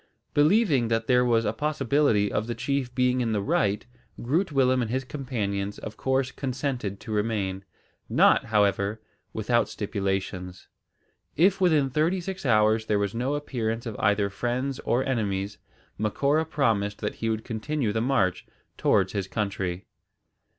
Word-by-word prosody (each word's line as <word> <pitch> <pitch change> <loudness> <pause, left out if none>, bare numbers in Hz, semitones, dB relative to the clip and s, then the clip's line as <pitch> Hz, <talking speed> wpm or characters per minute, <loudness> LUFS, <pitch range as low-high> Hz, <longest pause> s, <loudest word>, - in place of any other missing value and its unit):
Believing 150 - +3
that 115 0 0
there 125 0 +4
was 115 -2 +2
a 105 - 0
possibility 140 -7 +1
of 105 +2 -1
the 120 - -3
chief 135 -3 -2
being 125 0 +2
in 115 -2 0
the 105 - +1
right, 130 - 0 0.3
Groot 160 +9 0
Willem 130 -2 +3
and 115 - -2
his 130 +3 -1
companions 105 -8 -3
of 110 - -7
course 130 -1 0
consented 130 -6 -3
to 110 - -8
remain; 105 -3 -1 0.5
not, - - +4
however, 105 -1 +1 0.3
without 120 +2 +1
stipulations. 95 -3 -3 0.7
If 190 +5 +3
within 155 -7 +3
thirty 160 +7 +1
six 185 -3 -5
hours 110 -1 +3
there 105 - +2
was 100 -1 -1
no 125 +5 -1
appearance 115 -5 -3
of 115 -3 -5
either 100 0 +2
friends 125 +5 -2
or 125 +2 0
enemies, 100 -5 -2 0.4
Macora 140 +9 +1
promised 110 -10 0
that - - -3
he 115 - -1
would 110 0 -2
continue 120 +1 -2
the 110 +2 -1
march 105 -8 +1 0.3
towards - - +2
his 100 -2 -2
country. 95 -3 -3
115 Hz, 150 wpm, -26 LUFS, 105-135 Hz, 0.7 s, there